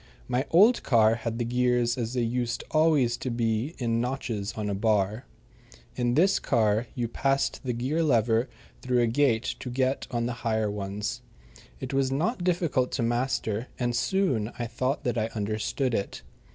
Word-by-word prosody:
My 125 +3 -1
old 210 +9 +5
car 110 -3 +4
had 115 0 -3
the 120 - -1
gears 125 0 +1
as 120 0 -3
they 125 - +1
used 120 0 -2
always 155 -7 +3
to 130 - -4
be 115 +5 -1
in 115 -2 0
notches 120 -5 -3
on 110 -2 -4
a 100 - -1
bar. 105 +3 0 0.7
In 120 -1 0
this 190 +6 +4
car 110 -1 +1
you 120 -2 -1
passed 135 +5 0
the 125 -2 -1
gear 130 +8 -1
lever 115 -4 +2 0.3
through 125 -1 +1
a - - +4
gate 115 -1 +1
to 125 - -6
get 130 +2 -1
on 120 -1 -1
the 120 - -2
higher 110 -2 0
ones. 105 +4 -4 0.6
It - - -5
was 135 -1 +1
not 175 - -1
difficult 170 -8 +1
to 125 - 0
master, 120 -1 -1
and 120 -1 -1
soon 120 - 0
I 120 - -2
thought 130 +5 -2
that 120 -4 0
I 110 - 0
understood 110 +5 -1
it. 100 - -3
120 Hz, 175 wpm, -27 LUFS, 115-135 Hz, 0.7 s, old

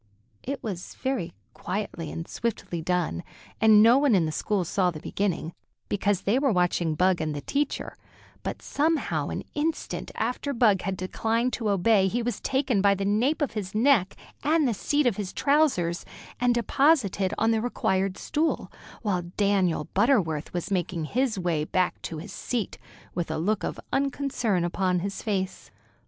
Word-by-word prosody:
It 275 0 -5
was 185 -5 -5
very 260 -10 -2 0.2
quietly 180 -5 -4
and 165 - -6
swiftly 205 -7 -3
done, 175 - -1 0.4
and 215 -1 +7
no 235 +4 +7
one 280 -6 +4
in 175 -4 +3
the 155 - -2
school 200 +4 0
saw 180 +2 +1
the 160 -3 -6
beginning, 175 -2 -2 0.4
because 205 -1 +1
they 220 +6 +2
were 275 -2 +2
watching 175 -4 +1
Bug 180 +1 +2
and 155 -1 -2
the 145 - -4
teacher; 280 - -2 0.5
but - - -5
somehow 315 +2 0
an - - -4
instant 310 +2 -2
after 250 +5 -2
Bug 220 -6 +4
had 190 0 -3
declined 225 +6 -1
to 225 -3 -1
obey 200 0 +4
he 235 +5 -1
was 240 0 -2
taken 265 -6 +1
by 200 0 +4
the 195 0 -2
nape 250 +10 +2
of 280 - -1
his 205 -3 -5
neck 220 -5 +3 0.3
and 310 0 +3
the 235 - +1
seat 290 +8 +1
of 235 -6 +2
his 200 -3 -3
trousers, 270 - +2 0.4
and 245 0 +3
deposited 235 - +2
on 225 +1 +3
the 220 -1 +1
required 195 -5 0
stool, 315 +2 -1 0.3
while 180 -5 -1
Daniel 195 -6 +2
Butterworth 190 - +2
was 175 +3 -4
making 175 -3 -1
his 245 +4 0
way 170 -4 0
back 180 +3 0
to 160 - -5
his 175 +7 -8
seat, 235 -6 -3 0.3
with 175 -1 -2
a - - -2
look 205 +6 0
of - - -3
unconcern 270 -8 0
upon 180 0 0
his 195 +1 -4
face. 190 -3 -3
205 Hz, 170 wpm, -26 LUFS, 180-245 Hz, 0.5 s, and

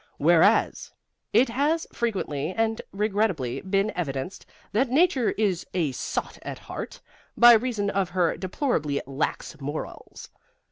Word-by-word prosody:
WHEREAS - - +3 0.4
it 240 +4 +4
has 295 +7 0
frequently 185 -8 -2
and 225 0 0
regrettably 200 - -1
been 195 +2 0
evidenced 140 0 -4 0.2
that 240 +5 +1
Nature 275 -3 +3
is 200 -5 0
a 165 -6 +1
sot 130 - -4
at - - -6
heart, - - -7 0.4
by 240 0 +9
reason 220 -3 +1
of 195 -2 0
her 175 -2 +1
deplorably 175 - -1
lax 135 +2 -3
morals. 145 +3 -7
200 Hz, 125 wpm, -25 LUFS, 160-235 Hz, 0.4 s, by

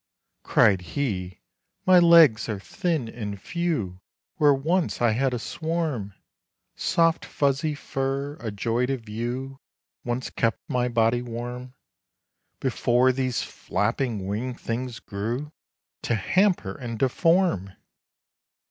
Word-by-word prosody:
Cried 95 -3 +4
he, 90 -3 -3 0.4
"My 185 -1 +7
legs 165 -11 +6
are 105 -3 -2
thin 165 - -2
and 105 -3 -5
fewWhere 130 - -2 0.6
once 170 +5 0
I 120 -2 +3
had 130 +4 +1
a 125 - -1
swarm! 155 - -3 0.6
Soft 165 -1 +2
fuzzy 140 +2 0
fur—a 135 -2 -3
joy 115 +4 -1
to 135 0 0
view—Once 120 +2 -6
kept 115 -1 -1
my 125 -1 0
body 115 0 +2
warm, 125 +2 -6 0.8
Before 125 0 +2
these 130 -1 -1
flapping 115 -8 -2
wing 115 +6 -3
things 120 +1 -4
grew, 115 +9 -4 0.5
To 120 - 0
hamper 180 - +2
and 115 -2 -6
deform!" 135 - +2
125 Hz, 105 wpm, -25 LUFS, 115-145 Hz, 0.8 s, My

